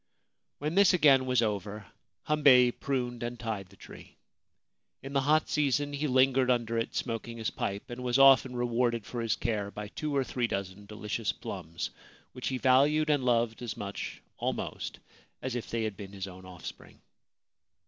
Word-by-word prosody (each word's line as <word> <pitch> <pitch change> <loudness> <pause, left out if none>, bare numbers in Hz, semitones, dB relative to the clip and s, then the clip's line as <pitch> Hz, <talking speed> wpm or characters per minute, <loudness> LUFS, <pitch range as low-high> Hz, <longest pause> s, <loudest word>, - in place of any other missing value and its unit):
When 150 +2 -3
this 195 0 +5
again 135 -6 +5
was 125 -2 +3
over 105 -1 -3 0.4
Hambei 140 -5 +6
pruned 125 -2 -3
and 120 0 -4
tied 110 -5 -4
the 100 - -18
tree. - - -13 0.9
In 135 +1 -7
the 140 - +3
hot 150 +2 +3
season 145 0 +1
he 145 +2 -1
lingered 130 0 +3
under 120 -2 +1
it 115 - -3
smoking 115 -1 -3
his 110 -1 -2
pipe, 100 +1 -4
and 120 +1 -6
was 125 0 +1
often 135 -2 +6
rewarded 120 -2 0
for 120 - -4
his 115 -2 +1
care 105 -2 -2
by 105 0 -7
two 150 +5 -3
or 135 - +3
three 125 -2 -1
dozen 100 0 -5
delicious 105 +1 -3
plums, 85 -3 -6 0.4
which 125 - -5
he 130 - -1
valued 145 +4 +4
and 145 -3 +2
loved 120 -2 +1
as 120 -3 -5
much 100 0 -6
almost - - -3 0.4
as 130 -1 -4
if 120 - -4
they 115 -1 -1
had 110 -2 -2
been 100 -2 -9
his 95 -1 -5
own 95 0 -11
offspring. 90 -3 -10
120 Hz, 175 wpm, -30 LUFS, 105-135 Hz, 0.9 s, Hambei